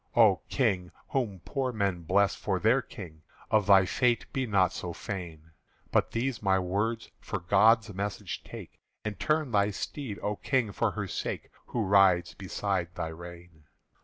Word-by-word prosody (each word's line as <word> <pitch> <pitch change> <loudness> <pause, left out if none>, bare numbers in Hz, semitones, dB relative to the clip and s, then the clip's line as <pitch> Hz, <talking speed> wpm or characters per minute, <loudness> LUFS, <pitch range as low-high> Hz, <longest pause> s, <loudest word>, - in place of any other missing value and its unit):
"O 110 -5 +6
King, 95 -9 0 0.2
whom 110 -9 -2
poor 135 -3 -1
men 100 -6 -1
bless 95 +4 +3
for 95 -3 -2
their 115 +7 +4
King, 85 -11 -10 0.3
Of 105 -2 +3
thy 95 -2 +7
fate 120 +5 +1
be 130 -2 -1
not 95 -4 +3
so 90 -2 -5
fain; 85 -5 -7 0.4
But - - +2
these 120 +1 -2
my 95 -2 +3
words 105 +5 -1
for 100 - -4
God's 105 +4 +4
message 100 +1 -4
take, - - -10 0.3
And 105 -3 -4
turn 155 -3 +1
thy 100 -1 +3
steed, 105 +2 -5
O 105 0 -1
King, 130 -6 0
for - - +1
her - - -3
sake - - -4 0.2
Who 120 - -1
rides 95 -3 +4
beside 95 -2 -3
thy 80 - -3
rein!" 85 -1 -11
100 Hz, 160 wpm, -29 LUFS, 90-115 Hz, 0.4 s, thy